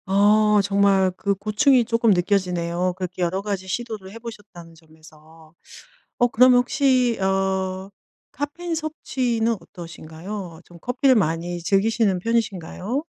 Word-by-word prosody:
어 210 +2 +4
정말 195 -1 +3
그 200 +1 -1
고충이 225 +6 +2
쪼끔 230 -1 +2
느껴지네요. 180 -1 0
그렇게 185 -1 -5
여러 180 +2 0
가지 200 -2 -4
시도를 215 -2 -5
해 225 - -10
보셨다는 205 -7 -11
점에서. 160 0 -19 0.6
어 245 - +3
그러면 250 +1 +5
혹시 250 -1 +1
어 190 0 -1 0.4
카페인 330 +5 -5
섭취는 250 -7 -1
어떠신가요? 170 +1 -9
좀 175 -1 -16
커피를 255 +1 +2
많이 175 -2 -1
즐기시는 200 0 +1
편이신가요? 220 - -2
200 Hz, 295 characters per minute, -22 LUFS, 180-230 Hz, 0.6 s, 그러면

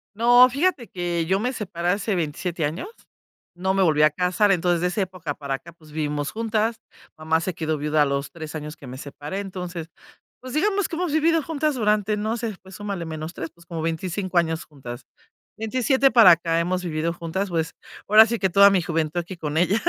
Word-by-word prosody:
No, 245 +3 +7
fíjate 280 -2 0
que 175 -2 -2
yo 190 +3 +1
me 250 +5 -1
separé 175 -6 -3
hace 200 +3 0
27 170 0 -2
años, 165 - -4 0.7
no 190 +2 0
me 195 - +2
volví 155 -4 +4
a 155 - +6
casar, 180 +5 +2
entonces 175 -2 +2
de 180 - +2
esa 200 +3 -1
época 180 -5 -4
para 140 -1 -3
acá, 170 +5 -11
pues, 155 -2 -19
vivimos 150 -1 -2
juntas. 225 0 -1 0.4
Mamá 160 +1 +1
se 175 +1 -3
quedó 160 -2 -1
viuda 150 +1 +2
a - - +2
los 140 0 -2
3 160 -2 -8
años 150 0 -6
que - - -13
me 130 +1 -8
separé, 145 +6 -6
entonces, 180 -4 -6 0.5
pues, 255 0 -8
digamos 395 +4 +1
que - - -5
hemos 355 -3 -1
vivido 325 +1 +3
juntas 305 0 -1
durante, 210 -2 +1
no 220 +3 -1
sé, 225 -3 -4
pues 190 0 -13
súmale 200 -4 -4
menos 160 +1 -6
3, 165 - -5
pues, 170 0 -21
como 165 -2 -5
25 180 +3 -2
años 165 -1 +1
juntas, 125 -5 -9 0.6
27 255 +4 +2
para 225 -7 +8
acá 165 0 +2
hemos 180 +2 -1
vivido 165 -1 -1
juntas, 175 +4 -3
pues 165 -2 -2 0.3
ahora 215 +2 +8
sí 230 0 -2
que 190 - +2
toda 200 +3 +7
mi 190 -2 +3
juventud 160 0 -1
aquí 175 +1 -6
con 150 -1 -3
ella. 185 +6 +2
180 Hz, 210 wpm, -23 LUFS, 160-215 Hz, 0.7 s, para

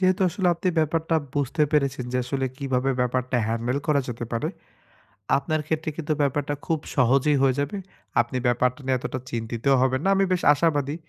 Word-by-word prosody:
যেহেতু 185 +1 +3
আসলে 180 +1 0
আপনি 175 +2 -2
ব্যাপারটা 160 +1 +1 0.2
বুঝতে 145 +2 0
পেরেছেন। 140 -3 +1
যে, - - +1
আসলে 135 +1 -1
কিভাবে 135 -1 0
ব্যাপারটা 125 0 0
হ্যান্ডেল 115 +4 -1
করা 150 -2 +3
যেতে 120 0 -4
পারে, 115 - -1 0.9
আপনার 155 +2 -1
ক্ষেত্রে 160 0 -1
কিন্তু 155 -1 -1
ব্যাপারটা 145 +1 0
খুব 160 -1 0 0.2
সহজেই 135 +3 +3
হয়ে 130 -2 +3
যাবে। 145 +8 -2 0.4
আপনি 120 +2 -4
ব্যাপারটা 125 +2 +1
নিয়ে 130 -1 +2
এতটা 130 - -4
চিন্তিত 115 0 -4 0.2
হবেন 130 0 +1
না। 195 - +3
আমি 195 - +3
বেশ 180 - +1
আশাবাদি, 145 -1 0
140 Hz, 175 wpm, -25 LUFS, 125-155 Hz, 0.9 s, যেহেতু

